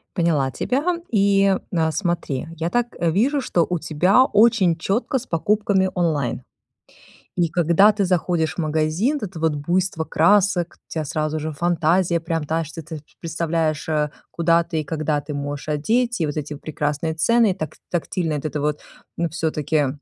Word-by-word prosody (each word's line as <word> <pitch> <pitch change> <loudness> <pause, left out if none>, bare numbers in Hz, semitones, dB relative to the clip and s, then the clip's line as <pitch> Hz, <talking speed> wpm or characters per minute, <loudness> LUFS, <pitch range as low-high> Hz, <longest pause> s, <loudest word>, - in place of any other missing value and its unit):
Поняла 160 -7 +1
тебя. 260 - -1 0.3
И, 195 -2 +3 0.2
а, 160 -1 +2
смотри, 165 -5 -2
я 165 +2 -2
так, 240 +3 +1
э, 170 - +1
вижу, 255 - +2
что 175 -9 +1
у 180 - -1
тебя 175 - +3
очень 210 -7 +4
чётко 225 - -1
с 250 - -10
покупками 195 +2 +1
онлайн. 145 -9 0 0.9
И 175 -2 +2
когда 175 +5 +4
ты 205 -2 0
заходишь 175 -3 0
в 170 - -2
магазин, 155 - 0
вот 205 - -4
это 175 - -9
вот 160 -2 +1
буйство 170 +3 -1
красок, 180 +1 +2
у - - -29
тебя 155 -2 -2
сразу 155 +1 -2
же 155 +1 -4
фантазия 170 +2 +1
прям 165 -1 -2
та 160 +2 -1
что, 160 +2 -8
ты 160 -1 -8 0.2
представляешь, 165 -2 -1
э, 150 -1 0 0.2
куда 170 0 +2
ты 160 -1 -3
и - - -6
когда 150 0 -1
ты 145 +1 -7
можешь 145 +1 -5
одеть. 225 +9 0
И - - +2
вот 150 +1 -4
эти 150 0 -4
прекрасные 150 +1 -3
цены, 230 +6 +3
и - - -1
так 155 -4 -6
тактильно 170 -2 -1
вот 145 - -5
это 150 -1 -2
вот, 150 0 -1 0.4
ну, 170 -1 0
всё-таки 155 -2 0
165 Hz, 175 wpm, -22 LUFS, 155-190 Hz, 0.9 s, очень